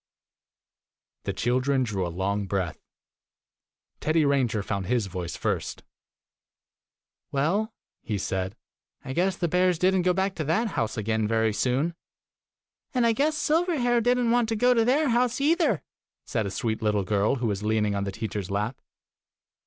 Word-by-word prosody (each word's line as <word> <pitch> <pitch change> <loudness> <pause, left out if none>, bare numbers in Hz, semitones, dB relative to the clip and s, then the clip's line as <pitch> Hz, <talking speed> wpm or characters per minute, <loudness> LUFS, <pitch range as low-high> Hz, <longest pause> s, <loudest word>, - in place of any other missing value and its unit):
The - - -1
children 130 +3 +1
drew 100 -6 -2
a - - -3
long 100 +3 -2
breath. 90 -5 -2 1.2
Teddy 155 0 +2
Ranger 125 -7 +1
found 100 -2 -3
his 120 -3 +1
voice 90 -2 -5
first. - - -3 1.5
"Well," 185 +11 +1 0.3
he 105 -3 -3
said, 95 +1 -2 0.3
" - - -38
I 130 - -4
guess 180 +4 +1
the 170 - 0
bears 180 +1 +2
did 185 +3 +3
n't 185 -2 +2
go 180 - +3
back 190 +1 0
to 155 - -1
that 195 +10 +1
house 110 - -2
again 110 0 0
very 110 -1 +1
soon! 135 +9 0 0.5
" - - -54
"And 245 -2 +3
I 230 - +4
guess 300 +6 +1
Silverhair 300 -8 +2
did 245 +2 +3
n't 240 -2 +1
want 240 -1 +2
to 225 - 0
go 245 +3 +4
to 230 -2 +3
their 275 +5 +2
house 245 +1 +2
either! 295 - +2 0.2
" - - -66
said 110 -3 -1
a - - -2
sweet 110 +3 -2
little 105 -2 +1
girl 105 +5 +1
who 125 -2 -3
was 100 -3 -1
leaning 105 -1 +1
on 100 0 -1
the 100 - -3
teacher's 100 -1 -4
lap. 105 +5 -2
130 Hz, 175 wpm, -26 LUFS, -, 1.5 s, I